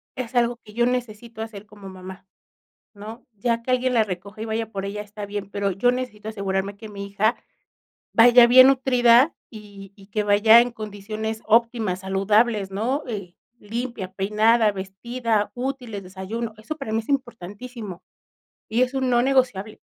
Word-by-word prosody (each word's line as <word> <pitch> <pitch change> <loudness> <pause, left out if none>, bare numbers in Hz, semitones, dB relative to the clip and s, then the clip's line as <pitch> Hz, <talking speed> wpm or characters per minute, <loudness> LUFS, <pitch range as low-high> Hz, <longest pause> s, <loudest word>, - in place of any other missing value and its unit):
es 255 -1 -6
algo 240 0 +2
que 210 - -15
yo 240 +2 +2
necesito 235 -2 -4
hacer 215 -2 -8
como 200 -1 -12
mamá, 185 +1 -11 0.7
¿no? 220 +3 -10
Ya 230 +3 -1
que 255 - -2
alguien 255 0 +1
la 230 -2 +4
recoja 200 +2 -7
y - - -3
vaya 225 0 -3
por 195 -2 -5
ella 205 +1 -4
está 210 0 -8
bien, 200 -1 -6
pero 200 -1 -1
yo 205 +7 +2
necesito 245 -4 -5
asegurarme 200 -1 -3
que 220 0 -10
mi 200 -1 -7
hija 200 +4 +1 0.8
vaya 240 +1 +8
bien 255 +2 +8
nutrida, 255 0 +4 0.2
y 205 -3 -12
y 195 -2 -16
que 210 +1 -1
vaya 210 +3 +7
en 245 +1 +1
condiciones 215 +1 -6
óptimas, 225 -4 +2
saludables, 195 +2 +1
¿no? 240 +9 -1
Eh, 195 -6 -6 0.2
limpia, 225 -4 -5
peinada, 215 +3 +3
vestida, 210 +3 -2
útiles, 250 -5 -4
desayuno. 195 +5 -6
Eso 230 +9 -6
para 275 -7 -6
mí 220 - +1
es 220 - -15
importantísimo. 230 -5 -5 0.7
Y 225 +3 +1
es 255 +1 -3
un 260 -1 0
no 240 - +4
negociable. 250 -6 0
220 Hz, 165 wpm, -23 LUFS, 200-240 Hz, 0.8 s, vaya